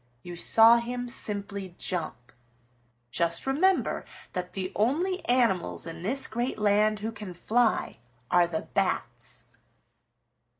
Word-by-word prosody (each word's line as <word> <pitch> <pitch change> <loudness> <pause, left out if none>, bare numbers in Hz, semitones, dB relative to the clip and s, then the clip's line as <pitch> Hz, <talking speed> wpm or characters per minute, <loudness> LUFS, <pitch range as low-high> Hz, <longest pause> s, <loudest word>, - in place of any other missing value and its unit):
You 175 0 -8
saw 225 +6 +7
him 245 +1 -4
simply 200 -6 -5
jump. 160 -9 -5 0.8
Just 170 +2 0
remember 345 +8 +1 0.3
that 180 -1 -4
the 185 -1 -4
only 335 - 0
animals 190 - +1
in 165 - -7
this 255 +9 +3
great 240 +4 -3
land 210 0 +2
who 220 +2 -3
can 205 -5 -9
fly 225 - 0 0.3
are 175 -1 +4
the 160 -2 -3
Bats. - - -3
210 Hz, 120 wpm, -27 LUFS, 180-245 Hz, 0.8 s, saw